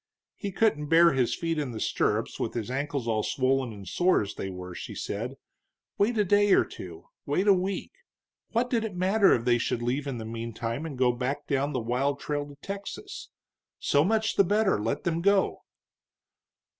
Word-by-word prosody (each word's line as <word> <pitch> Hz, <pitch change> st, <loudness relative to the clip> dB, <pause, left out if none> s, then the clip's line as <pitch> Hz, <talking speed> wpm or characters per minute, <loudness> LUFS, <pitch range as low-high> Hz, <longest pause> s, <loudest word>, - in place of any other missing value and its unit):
He 200 Hz, -, -5 dB
couldn't 180 Hz, -8 st, +1 dB
bear 165 Hz, +2 st, +6 dB
his 130 Hz, -3 st, +1 dB
feet 165 Hz, -2 st, -2 dB
in 135 Hz, -5 st, -3 dB
the 110 Hz, -, -5 dB
stirrups -, -, 0 dB
with -, -, -2 dB
his 115 Hz, 0 st, -3 dB
ankles 140 Hz, -2 st, -2 dB
all 110 Hz, -2 st, +1 dB
swollen 130 Hz, +1 st, 0 dB
and 100 Hz, -3 st, -10 dB
sore 180 Hz, -, +3 dB
as 100 Hz, -, -6 dB
they 95 Hz, -, -5 dB
were, 90 Hz, -1 st, -7 dB
she -, -, -7 dB
said; 120 Hz, +6 st, -4 dB, 0.6 s
wait 220 Hz, +3 st, +2 dB
a 210 Hz, -, +4 dB
day 205 Hz, +1 st, +4 dB
or -, -, +5 dB
two 85 Hz, -2 st, -10 dB, 0.2 s
wait 180 Hz, +8 st, +1 dB
a 200 Hz, -, +8 dB
week. 190 Hz, +1 st, -2 dB, 0.6 s
What 235 Hz, +2 st, +1 dB
did 230 Hz, -3 st, +1 dB
it 215 Hz, -4 st, -4 dB
matter 195 Hz, +3 st, +4 dB
if 115 Hz, -, -3 dB
they 120 Hz, -1 st, +3 dB
should 120 Hz, 0 st, -1 dB
leave 135 Hz, +4 st, -1 dB
in 135 Hz, -3 st, -3 dB
the 110 Hz, -, -6 dB
meantime, 115 Hz, +4 st, -4 dB
and 140 Hz, -5 st, -7 dB
go 125 Hz, -1 st, +4 dB
back 125 Hz, +3 st, -3 dB
down 140 Hz, +1 st, 0 dB
the 130 Hz, -, 0 dB
wild 130 Hz, +5 st, 0 dB
trail 145 Hz, -1 st, -3 dB
to 145 Hz, -, -12 dB
Texas? 200 Hz, -, -7 dB, 0.5 s
So 145 Hz, 0 st, +2 dB
much 220 Hz, +3 st, +1 dB
the 200 Hz, -, +7 dB
better; 205 Hz, -, +2 dB
let 140 Hz, -, -2 dB
them 170 Hz, -1 st, 0 dB
go. 200 Hz, +1 st, +2 dB
145 Hz, 195 wpm, -28 LUFS, 120-190 Hz, 0.6 s, a